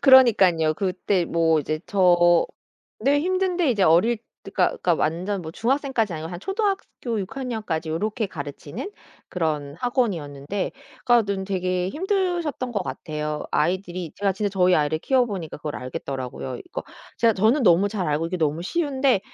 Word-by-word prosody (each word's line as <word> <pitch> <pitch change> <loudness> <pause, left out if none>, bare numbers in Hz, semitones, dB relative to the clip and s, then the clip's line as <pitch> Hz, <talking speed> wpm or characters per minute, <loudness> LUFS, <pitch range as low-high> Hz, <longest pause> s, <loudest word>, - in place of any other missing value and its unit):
그러니깐요. 195 - +6
그때 185 0 0
뭐 165 -1 +2
이제 155 +2 -3
저 175 -3 +4 0.5
네 285 +1 +3
힘든데 365 -2 +1
이제 205 -5 +2
어릴 185 +9 +4
때 225 - -16
그러니까 - - +1
그러니까 175 - +3
완전 180 +6 -1
뭐 160 -2 -7
중학생까지는 240 - 0
아니고 160 +2 -6
한 175 - -6
초등학교 385 - -2
6 190 +6 -7
학년까지 220 -11 -3
요렇게 215 +7 -1
가르치는 145 - -7 0.4
그런 150 -4 -2
학원이었는데 190 - -1 0.3
그러니까는 200 -5 +2
되게 185 -1 -1
힘드셨던 350 - -1
것 205 -4 -1
같아요. 150 -3 -4
아이들이 175 +1 -1
제가 200 -1 +1
진짜 205 +2 -1
저희 185 -2 +3
아이를 150 0 +1
키워보니까 205 - 0
그걸 150 -1 -5
알겠더라고요. 130 0 -5
그러니까 125 - -6 0.4
제가 230 -1 +4
저는 220 +9 +3
너무 190 -1 +5
잘 200 -6 -2
알고 150 +2 0
이게 185 +2 -3
너무 155 -1 0
쉬운데 270 - +1
190 Hz, 390 characters per minute, -24 LUFS, 160-240 Hz, 0.5 s, 그러니깐요